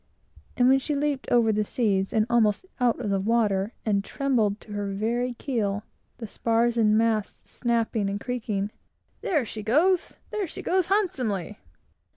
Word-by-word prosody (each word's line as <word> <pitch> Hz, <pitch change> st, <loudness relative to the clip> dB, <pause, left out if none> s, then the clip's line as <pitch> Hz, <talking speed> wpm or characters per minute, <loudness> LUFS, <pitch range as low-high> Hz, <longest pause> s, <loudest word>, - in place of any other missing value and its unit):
And 245 Hz, -, +4 dB
when 265 Hz, +1 st, +5 dB
she 295 Hz, +2 st, -2 dB
leaped 285 Hz, -1 st, -1 dB
over 235 Hz, -2 st, +4 dB
the 210 Hz, 0 st, +1 dB
seas, 200 Hz, -4 st, 0 dB
and 215 Hz, -1 st, +2 dB
almost 235 Hz, -, +2 dB
out 245 Hz, -1 st, +2 dB
of 215 Hz, -5 st, -2 dB
the 195 Hz, -, +1 dB
water, 210 Hz, -1 st, +1 dB
and 200 Hz, -2 st, +1 dB
trembled 220 Hz, -6 st, 0 dB
to 210 Hz, -, -14 dB
her 205 Hz, -1 st, -3 dB
very 240 Hz, +5 st, -1 dB
keel, 210 Hz, -6 st, -2 dB, 0.3 s
the 235 Hz, -, -6 dB
spars 230 Hz, +2 st, +1 dB
and 215 Hz, -2 st, +4 dB
masts 220 Hz, -2 st, -1 dB
snapping 230 Hz, -4 st, 0 dB
and 200 Hz, +1 st, -3 dB
creaking, 215 Hz, -4 st, -3 dB, 0.5 s
"There 335 Hz, -, +1 dB
she 220 Hz, 0 st, -6 dB
goes! 320 Hz, -, +2 dB, 0.2 s
There 420 Hz, -3 st, -2 dB
she -, -, -8 dB
goes, 370 Hz, -1 st, +1 dB
handsomely! 265 Hz, -, -1 dB
230 Hz, 165 wpm, -26 LUFS, 210-255 Hz, 0.5 s, when